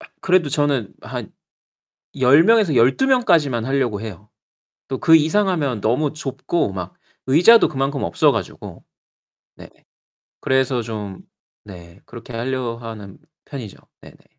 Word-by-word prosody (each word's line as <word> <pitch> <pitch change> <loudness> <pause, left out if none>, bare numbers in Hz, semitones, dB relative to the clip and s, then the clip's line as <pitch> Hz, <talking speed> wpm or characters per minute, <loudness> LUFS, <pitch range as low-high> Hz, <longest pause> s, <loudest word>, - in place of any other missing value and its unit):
아 - - -13
그래도 180 -4 +2
저는 140 -6 -1
한 - - -7 0.9
10 135 +5 +5
명에서 215 - +3
12 130 - +3
명까지만 165 - +2
하려고 130 -6 -1
해요. 105 -2 -9 0.6
또 130 - -4
그 160 0 +6
이상하면 160 - 0
너무 130 +8 0
좁고 135 - -3
막 90 -1 -6 0.3
의자도 175 - +6
그만큼 135 0 -3
없어 85 - +2
가지고. - - -7 0.7
네. - - -13 0.7
그래서 130 -1 0
좀 105 -4 -7 0.5
네 85 -2 -13
그렇게 120 0 -12
하려 120 0 -3
하는 110 -4 -10 0.3
편이죠. 125 -9 -9 0.2
네네. - - -17
130 Hz, 245 characters per minute, -20 LUFS, 115-155 Hz, 0.9 s, 그